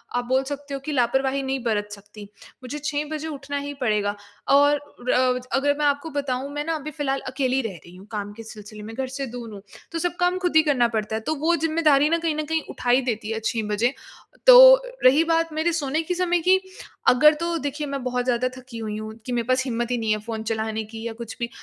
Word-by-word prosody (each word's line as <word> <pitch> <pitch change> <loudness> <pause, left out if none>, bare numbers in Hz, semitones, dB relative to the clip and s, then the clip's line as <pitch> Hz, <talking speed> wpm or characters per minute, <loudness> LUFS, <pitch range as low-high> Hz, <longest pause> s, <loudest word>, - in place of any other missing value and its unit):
आप 245 - 0
बोल 260 +2 +1
सकते 285 0 -6
हो 275 - -3
कि 290 +3 -6
लापरवाही 265 +1 +1
नहीं 265 -1 -2
बरत 210 -3 0
सकती। 205 +1 -11 0.4
मुझे 255 +4 -5
6 295 0 -2
बजे 310 +1 -4
उठना 285 -1 -5
ही 285 0 -5
पड़ेगा। 210 -3 0 0.3
और 285 +1 +5 0.4
अ 250 0 +2 0.2
अगर 285 +1 +2
मैं 295 - 0
आपको 285 +3 0
बताऊँ 275 -2 -3
मैं 295 - -2
न - - -13
अभी 305 -2 -3
फ़िलहाल 275 -2 -2
अकेली 260 0 0
रह 220 -5 -5
रही 175 +1 -14
हूँ 190 +2 -13
काम 205 -1 -4
के 225 +1 -10
सिलसिले 210 -1 -11
में 225 +1 -8
घर 265 0 -2
से 270 +1 -4
दूर 235 -2 -8
हूँ। 200 - -9 0.3
तो 330 - -3
सब 350 +1 -1
काम 355 +1 +2
खुद 355 -3 -1
ही 315 - +7
करना 270 -6 +3
पड़ता 220 -1 -2
है। 220 - -3
तो 315 +7 -2
वो 325 +4 +1
ज़िम्मेदारी 310 -2 +3
न 335 - +2
कहीं 325 -2 -1
न 310 - -2
कहीं 320 +1 0
उठा 245 - -4
ही 255 +2 +5
देती 225 -3 -3
है 225 - -2
6 225 -2 0
बजे। 230 +5 +1 0.5
तो - - +10 0.2
रही 280 +6 +6
बात 330 -1 0
मेरे 315 +2 +1
सोने 305 0 -1
के 345 +3 -3
समय 355 -1 +1
की 375 +1 +6 0.5
अगर 300 +5 +7
तो 340 0 -1
देखिए 290 +1 -4
मैं 275 -1 -4
बहुत 250 -1 -1
ज़्यादा 250 0 +1
थकी 255 -2 -10
हुई 215 -2 -4
हूँ 215 0 -6
कि 250 - -5
मेरे 235 -1 -1
पास 255 0 +2
हिम्मत 240 -1 -2
ही 245 - +1
नहीं 225 -2 -1
है 215 - +2
फ़ोन 220 0 -5
चलाने 220 0 -2
की 225 +1 -9
या 230 - -5
कुछ 230 0 -8
भी। 235 0 -2
265 Hz, 245 wpm, -24 LUFS, 225-300 Hz, 0.5 s, तो